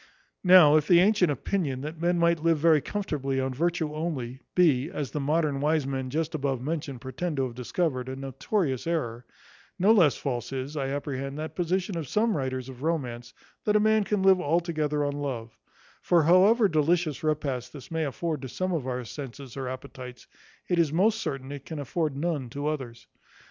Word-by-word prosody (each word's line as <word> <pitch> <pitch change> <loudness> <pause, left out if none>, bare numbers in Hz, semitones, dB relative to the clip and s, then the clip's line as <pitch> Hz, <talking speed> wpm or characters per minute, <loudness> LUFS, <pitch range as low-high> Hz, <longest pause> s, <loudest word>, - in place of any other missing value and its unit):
Now 180 -5 +8
if 150 -1 0
the 175 -2 +7
antient 195 -2 +4
opinion, 145 - -1
that 155 +3 -6
men 175 +1 +2
might 170 -1 +2
live 165 0 +3
very 155 -1 +4
comfortably 140 -8 -2
on 130 0 -1
virtue 165 +1 -1
only, 140 -6 -4
be, 155 -6 +3
as 150 - -4
the 150 - -3
modern 145 -1 0
wise 150 -1 +2
men 135 -1 -3
just 160 +4 -2
above 135 -4 -1
mentioned 140 -2 -4
pretend 145 +6 -4
to 135 - +1
have 125 -2 -3
discovered, 130 +1 -2
a 130 - -4
notorious 135 - -2
error; 120 -8 -2 0.5
no 195 +4 +4
less 175 -11 +5
false 125 -3 -3
is, 135 +2 -4
I 135 -3 -1
apprehend, 135 0 -4
that 155 +1 -5
position 180 +1 -1
of 155 - -5
some 215 - +1
writers 130 -3 -3
of 130 -1 -10
romance, 130 -7 -2 0.3
that 210 - +1
a - - +6
man 215 0 +3
can 205 -1 -1
live 190 -1 +5
altogether 155 -2 0
on 145 - -1
love; 130 -6 -5 0.5
for 170 -2 +3
however 200 +7 +5
delicious 160 -2 +1
repasts 140 -5 -1
this 140 +2 -12
may 160 0 0
afford 155 +1 -3
to 130 - -6
some 185 +8 -2
of 155 -7 -2
our 125 -1 -2
senses 135 0 -8
or 135 -2 -4
appetites, 125 -1 -9 0.4
it 175 -2 +1
is 160 -4 +3
most 215 +7 +2
certain 135 -3 -4
it 140 -2 -7
can 160 - -5
afford 145 0 -2
none 145 -5 -2
to 145 +4 -4
others. 130 -6 -5
150 Hz, 190 wpm, -27 LUFS, 130-170 Hz, 0.5 s, Now